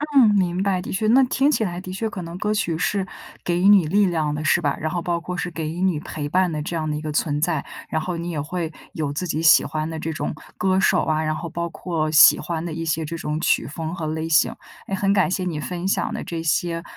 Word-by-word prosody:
嗯， 235 -6 +7
明 180 -1 +1
白， 190 -2 +1
的 - - -6
确 205 +3 -1
那 260 +4 +6
听 270 +3 +2
起 230 - +1
来 175 -4 -3
的 185 0 -7
确 220 +3 -2
可 190 - -6
能 170 +1 -7
歌 210 +2 0
曲 175 -6 0
是 195 +3 0 0.4
给 175 0 +1
予 190 - +4
你 200 -5 +7
力 200 +6 +3
量 160 -4 0
的 150 +1 -3
是 155 +3 +3
吧？ 145 -4 0
然 155 - -2
后 175 +2 -2
包 170 0 -1
括 180 +1 -5
是 180 - -3
给 160 -2 -4
予 165 +3 -5
你 185 -5 +2
陪 150 -1 -5
伴 180 +3 +2
的 155 - -3
这 170 - -4
样 155 -1 -2
的 150 - -1
一 - - -5
个 155 -1 -4
存 150 -1 0
在。 160 -2 0 0.2
然 160 - -1
后 180 +1 -3
你 170 +1 -4
也 155 -3 -2
会， 165 +2 -3 0.2
有 150 -3 -2
自 180 +5 -3
己 160 0 -2
喜 160 - +7
欢 155 0 -3
的 160 -1 -5
这 160 +1 -3
种 155 - -3 0.2
歌 190 0 +2
手 190 -1 +3
啊， 155 0 0
然 155 0 -1
后 170 - -5
包 170 +1 -3
括 160 -2 -2
喜 155 - +7
欢 165 -1 -3
的 165 - -4
一 165 - -4
些 160 0 -1
这 165 +2 -5
种 150 -1 -3
曲 - - +1
风 160 +2 -5
和 165 -3 -4
类 160 +1 -3
型。 160 -1 +3 0.3
哎， 195 - -1
很 195 +1 +1
感 190 -2 +3
谢 185 +1 -1
你 165 -4 -2
分 180 +3 -4
享 - - 0
的 - - -4
这 165 -1 -4
些， 165 +1 0
170 Hz, 295 characters per minute, -22 LUFS, 155-185 Hz, 0.4 s, 嗯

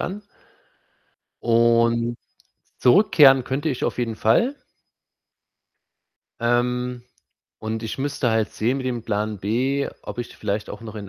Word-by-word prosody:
an 200 +3 -4 1.2
und 115 0 +2 0.6
zurückkehren 135 - +6
könnte 140 +5 -2
ich 130 -5 -2
auf - - -2
jeden 115 -3 -2
Fall 230 - +2 1.8
ähm, 125 +1 0 0.6
und 110 +1 -4
ich 110 +2 -5
müsste 135 -2 -1
halt 110 -1 +1
sehen 120 +5 0
mit 130 - -4
dem 120 -2 -2
Plan 105 -1 -2
B. 130 +8 0
Ob - - -8
ich 120 - -5
vielleicht 105 0 -3
auch - - -8
noch 115 -1 -9
in 105 -2 -7
120 Hz, 130 wpm, -23 LUFS, 110-130 Hz, 1.8 s, zurückkehren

